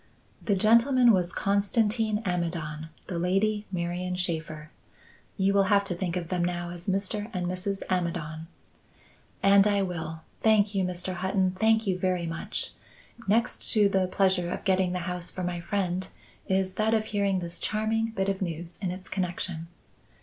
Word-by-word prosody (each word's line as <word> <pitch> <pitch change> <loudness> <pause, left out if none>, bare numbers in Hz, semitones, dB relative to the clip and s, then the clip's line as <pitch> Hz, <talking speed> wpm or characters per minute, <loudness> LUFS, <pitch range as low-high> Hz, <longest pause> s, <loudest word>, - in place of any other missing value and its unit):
"The 205 - +2
gentleman 235 +5 +5
was 180 -4 +2
Constantin 210 +2 +1
Amidon; 165 -3 -2 0.2
the 175 - -3
lady, 205 +4 +1
Marian 180 0 -2
Shaffer. 160 -3 -3 0.7
You 195 0 +2
will 200 -1 +4
have 200 0 +4
to 195 - -3
think 175 0 -2
of 170 -2 -4
them 180 -2 0
now 175 0 -2
as 175 +1 -8
Mr. 200 +2 -1
and 180 -2 -2
Mrs. 185 +2 -2
Amidon." 165 -3 -2 1.0
"And 195 +1 +6
I 200 -1 +2
will. 160 -3 -4 0.2
Thank 215 -2 +4
you, 195 -1 +1
Mr. 180 0 -3
Hutton, 190 +1 +1
thank 220 +4 +2
you 185 -2 0
very 180 -2 0
much. 165 0 -4 0.6
Next 230 +4 +1
to 210 -3 +5
the 190 -1 +2
pleasure 185 -2 +2
of - - -4
getting 190 -2 +2
the - - -1
house 180 -1 -3
for 185 - -5
my 175 -1 -2
friend, 185 0 -1 0.4
is 190 -1 +1
that 220 +3 +2
of 215 -1 +1
hearing 200 -3 +1
this 170 -1 -4
charming 220 +1 0
bit 195 0 0
of 195 -1 -1
news 170 -1 -5
its 185 0 -4
connection." 175 -2 -3
185 Hz, 165 wpm, -28 LUFS, 175-200 Hz, 1.0 s, And